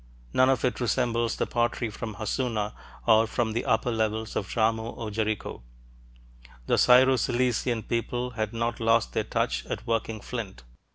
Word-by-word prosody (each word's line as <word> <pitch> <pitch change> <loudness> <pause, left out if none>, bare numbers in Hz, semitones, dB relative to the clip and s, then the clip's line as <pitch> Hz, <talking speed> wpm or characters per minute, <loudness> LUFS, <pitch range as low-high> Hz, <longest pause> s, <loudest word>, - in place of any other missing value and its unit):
None 130 +1 +5
of 135 0 +2
it 125 - -1
resembles 120 -1 0
the - - -1
pottery 120 -1 -1
from 110 0 -6
Hassuna 110 -1 -2 0.3
or 110 0 +5
from 115 -1 -1
the 120 - -2
upper 115 +2 +1
levels 110 0 -1
of 100 - -2
Jarmo 110 0 0
or 110 -2 -5
Jericho. 110 - -2 1.0
The - - +2
Syro 130 +1 +6
Cilician 120 -1 0
people 120 +1 -2
had 110 -2 -3
not 115 0 -2
lost 115 0 +2
their - - 0
touch - - -1
at - - -5
working 115 -1 -1
flint. 105 - -6
115 Hz, 160 wpm, -27 LUFS, 110-120 Hz, 1.0 s, Syro